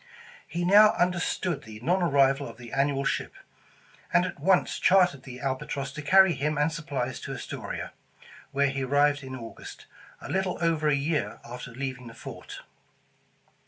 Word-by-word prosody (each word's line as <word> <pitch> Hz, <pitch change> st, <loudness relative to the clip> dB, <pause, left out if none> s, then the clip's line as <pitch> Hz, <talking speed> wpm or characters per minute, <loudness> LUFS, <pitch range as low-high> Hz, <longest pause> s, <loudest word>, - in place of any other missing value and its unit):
He 170 Hz, +3 st, -2 dB
now 210 Hz, +3 st, +7 dB
under 180 Hz, 0 st, +2 dB
stood 175 Hz, -2 st, -2 dB
the 110 Hz, -1 st, -11 dB
non 180 Hz, +8 st, +1 dB
arrival 140 Hz, -3 st, +3 dB
of 115 Hz, -, -12 dB
the 120 Hz, -1 st, -11 dB
annual 140 Hz, 0 st, +1 dB
ship, -, -, -2 dB, 0.8 s
and 175 Hz, +1 st, +4 dB
at 185 Hz, -, -6 dB
once 185 Hz, +5 st, +2 dB
chartered 180 Hz, -7 st, +4 dB
the 125 Hz, -2 st, -10 dB
Albatross 135 Hz, +1 st, -3 dB
to 150 Hz, +2 st, -7 dB
carry 190 Hz, +4 st, +6 dB
him 150 Hz, +1 st, -1 dB
and 150 Hz, +2 st, +2 dB
supplies 140 Hz, -6 st, -3 dB
to -, -, -6 dB
Astoria, -, -, -6 dB, 0.6 s
where 140 Hz, 0 st, +2 dB
he 135 Hz, 0 st, -3 dB
arrived 145 Hz, +2 st, +2 dB
in 130 Hz, -1 st, -7 dB
August, 115 Hz, -3 st, -10 dB, 0.3 s
a -, -, -9 dB
little 190 Hz, -1 st, -1 dB
over 165 Hz, -2 st, +1 dB
a 150 Hz, -, +4 dB
year 145 Hz, +2 st, -1 dB
after 125 Hz, +1 st, -8 dB
leaving 130 Hz, 0 st, -5 dB
the 115 Hz, -, -11 dB
fort. -, -, -9 dB
145 Hz, 165 wpm, -27 LUFS, 135-175 Hz, 0.8 s, now